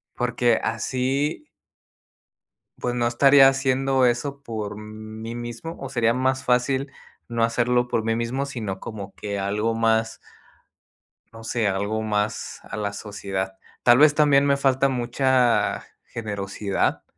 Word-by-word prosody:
porque 120 Hz, -1 st, +1 dB
así 130 Hz, -, -1 dB, 1.3 s
pues, 120 Hz, 0 st, -2 dB
no 120 Hz, -1 st, +1 dB
estaría 135 Hz, +3 st, +6 dB
haciendo 135 Hz, 0 st, +2 dB
eso 135 Hz, +4 st, -1 dB
por 110 Hz, -5 st, -5 dB
mí 110 Hz, +1 st, -8 dB
mismo, 120 Hz, +7 st, -6 dB
o 135 Hz, -, -6 dB
sería 120 Hz, -3 st, +2 dB
más 130 Hz, +1 st, 0 dB
fácil 130 Hz, +3 st, +1 dB, 0.4 s
no 115 Hz, -1 st, 0 dB
hacerlo 120 Hz, +2 st, +1 dB
por 115 Hz, -, -1 dB
mí 115 Hz, 0 st, 0 dB
mismo, 120 Hz, +4 st, -2 dB
sino 110 Hz, -9 st, -5 dB
como 100 Hz, -3 st, -8 dB
que 100 Hz, -1 st, -4 dB
algo 105 Hz, +3 st, -1 dB
más 115 Hz, 0 st, +1 dB, 1.1 s
no 115 Hz, 0 st, -12 dB
sé, 115 Hz, -1 st, 0 dB
algo 100 Hz, +3 st, -1 dB
más 105 Hz, -1 st, -2 dB
a 100 Hz, -, -7 dB
la 100 Hz, -1 st, -2 dB
sociedad. 95 Hz, -2 st, -5 dB, 0.3 s
Tal 120 Hz, 0 st, +6 dB
vez, 150 Hz, +1 st, +6 dB
también 145 Hz, -2 st, +4 dB
me 140 Hz, -1 st, +3 dB
falta 135 Hz, 0 st, +2 dB
mucha 125 Hz, -1 st, +1 dB, 0.2 s
generosidad, 100 Hz, -2 st, -2 dB
120 Hz, 135 wpm, -24 LUFS, 110-130 Hz, 1.3 s, estaría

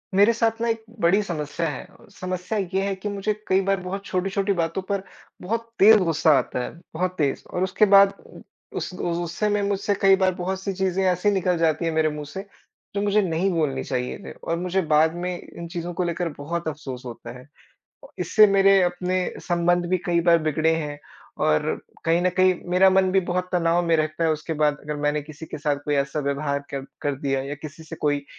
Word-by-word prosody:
मेरे 205 Hz, +4 st, +6 dB
साथ 225 Hz, -1 st, 0 dB
ना 235 Hz, -, +1 dB
एक 225 Hz, -1 st, -1 dB, 0.2 s
बड़ी 185 Hz, +4 st, +4 dB
समस्या 165 Hz, -2 st, -3 dB
है। 145 Hz, -, -6 dB, 0.3 s
समस्या 185 Hz, +3 st, -4 dB, 0.2 s
ये 190 Hz, -, +2 dB
है 200 Hz, -, 0 dB
कि 200 Hz, +2 st, -5 dB
मुझे 205 Hz, +1 st, -1 dB
कई 190 Hz, +1 st, +3 dB
बार 195 Hz, 0 st, 0 dB
बहुत 195 Hz, +2 st, -5 dB
छोटी-छोटी 195 Hz, +2 st, 0 dB
बातों 170 Hz, +1 st, -1 dB
पर 200 Hz, -1 st, -1 dB, 0.4 s
बहुत 230 Hz, +4 st, -3 dB
तेज़ 215 Hz, +2 st, +8 dB
गुस्सा 160 Hz, -2 st, +3 dB
आता -, -, -2 dB
है, -, -, -4 dB, 0.2 s
बहुत 185 Hz, +3 st, -1 dB
तेज़। 145 Hz, -3 st, 0 dB
और 180 Hz, -, -1 dB
उसके 190 Hz, +3 st, +3 dB
बाद 195 Hz, 0 st, +7 dB, 0.2 s
उ -, -, -10 dB, 0.4 s
उस -, -, -3 dB
गुस्से 175 Hz, +3 st, -2 dB
में 205 Hz, 0 st, +1 dB
मुझसे 200 Hz, 0 st, 0 dB
कई 195 Hz, -1 st, +6 dB
बार 190 Hz, -1 st, +2 dB
बहुत 185 Hz, +1 st, -3 dB
सी 195 Hz, -, -2 dB
चीज़ें 190 Hz, 0 st, 0 dB
ऐसी 180 Hz, +3 st, +1 dB
निकल 185 Hz, -3 st, +1 dB
जाती 165 Hz, 0 st, +1 dB
हैं 165 Hz, -, +1 dB
मेरे 160 Hz, 0 st, +2 dB
मुँह 150 Hz, 0 st, -6 dB
से 190 Hz, +7 st, -6 dB, 0.5 s
जो 200 Hz, -, 0 dB
मुझे 205 Hz, +1 st, +3 dB
नहीं 180 Hz, 0 st, 0 dB
बोलनी 150 Hz, -6 st, 0 dB
चाहिए 125 Hz, -1 st, -3 dB
थी -, -, -7 dB
और 165 Hz, -, -4 dB
मुझे 180 Hz, +2 st, 0 dB
बाद 155 Hz, +2 st, +4 dB
में 175 Hz, +1 st, -3 dB
इन 170 Hz, -, -9 dB
चीज़ों 175 Hz, 0 st, -5 dB
को 180 Hz, -, -1 dB
लेकर 170 Hz, 0 st, -2 dB
बहुत 165 Hz, +4 st, -4 dB
अफ़सोस 140 Hz, -5 st, -6 dB
होता 120 Hz, -1 st, -8 dB
है। 125 Hz, -, -15 dB, 0.7 s
इससे 215 Hz, -1 st, +5 dB
मेरे 195 Hz, -1 st, +5 dB
अपने 180 Hz, +1 st, 0 dB, 0.3 s
संबंध 175 Hz, 0 st, +2 dB
भी 185 Hz, -, +2 dB
कई 170 Hz, -1 st, +2 dB
बार 170 Hz, 0 st, +5 dB
बिगड़े 155 Hz, +1 st, +1 dB
हैं, 150 Hz, -2 st, -4 dB, 0.4 s
और 75 Hz, 0 st, +1 dB, 0.2 s
कहीं 165 Hz, +1 st, +3 dB
न 185 Hz, -, +3 dB
कहीं 185 Hz, 0 st, +5 dB, 0.2 s
मेरा 185 Hz, +2 st, +6 dB
मन 190 Hz, 0 st, +3 dB
भी 190 Hz, -, +4 dB
बहुत 180 Hz, 0 st, -2 dB
तनाव 170 Hz, -1 st, +2 dB
में 165 Hz, -, +3 dB
रहता 155 Hz, +1 st, -1 dB
है। 160 Hz, -, +3 dB
उसके 155 Hz, +2 st, -4 dB
बाद 150 Hz, -1 st, +2 dB
अगर 150 Hz, 0 st, -4 dB
मैंने 150 Hz, 0 st, 0 dB
किसी 155 Hz, +2 st, -10 dB
के -, -, -7 dB
साथ 145 Hz, -1 st, 0 dB
कोई 145 Hz, -, 0 dB
ऐसा 140 Hz, +2 st, 0 dB
व्यवहार 140 Hz, 0 st, -1 dB
कर 135 Hz, -1 st, -4 dB, 0.2 s
कर 145 Hz, -1 st, 0 dB
दिया 135 Hz, -1 st, 0 dB
या 140 Hz, +2 st, -5 dB
किसी 155 Hz, +2 st, -10 dB
से 155 Hz, -, -8 dB
कोई 145 Hz, -1 st, 0 dB
175 Hz, 215 wpm, -24 LUFS, 155-190 Hz, 0.7 s, तेज़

